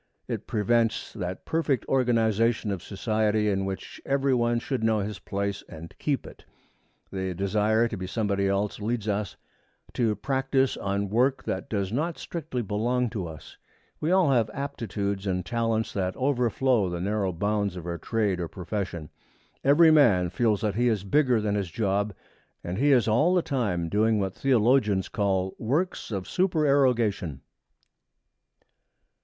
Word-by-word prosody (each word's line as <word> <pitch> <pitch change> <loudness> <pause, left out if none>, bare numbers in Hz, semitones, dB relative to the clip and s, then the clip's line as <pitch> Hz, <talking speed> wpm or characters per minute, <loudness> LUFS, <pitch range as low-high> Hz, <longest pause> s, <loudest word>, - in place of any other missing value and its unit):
It - - -4
prevents 115 +1 +1
that 90 -3 -5
perfect 155 -7 0
organization 115 -3 +2
of 95 -3 -3
society 105 +1 0
in 95 0 -1
which 95 0 -6
every 140 -1 +1
one 120 -1 +2
should 125 -1 -3
know 110 -2 +2
his 105 0 -5
place 100 0 -3
and 85 0 -10
keep 140 -4 -1
it. - - -12 0.7
The 95 -2 -3
desire 105 +4 +2
to 115 - -5
be 95 -2 -5
somebody 100 -1 0
else 100 +2 -1
leads 110 0 -2
us 105 -1 -2 0.6
to 115 -4 +1
practice 135 +3 0
on 100 0 -2
work 130 +5 +2
that 95 - -4
does 100 -3 -1
not 160 +6 -1
strictly 150 -7 -4
belong 120 +4 0
to 100 -7 -3
us. 80 -2 -11 0.4
We 155 - -1
all 185 -5 +4
have 115 -4 +2
aptitudes 100 -7 -3
and 90 -1 -1
talents 115 -2 -1
that 95 -2 -2
overflow 125 -5 +1
the 85 0 -4
narrow 100 +1 0
bounds 100 +2 -1
of 90 -2 -7
our 85 -1 -4
trade 105 -2 0
or 85 - -2
profession. 90 -4 -5 0.5
Every 160 +4 +6
man 105 - +4
feels 110 +1 +1
that 105 -2 0
he 120 +4 +1
is 110 -5 +1
bigger 125 +2 +3
than 105 -1 -1
his 100 -4 -1
job, 100 +1 -1 0.5
and 90 +4 -4
he 145 +2 +4
is 125 -5 +4
all 150 +12 +3
the 180 - +2
time 100 - -1
doing 110 +4 +2
what 95 -2 -1
theologians 115 -6 +2
call 95 -2 0
'works 150 +11 -1
of 100 -4 -4
supererogation.' 130 - +1
110 Hz, 155 wpm, -26 LUFS, 95-125 Hz, 0.7 s, Every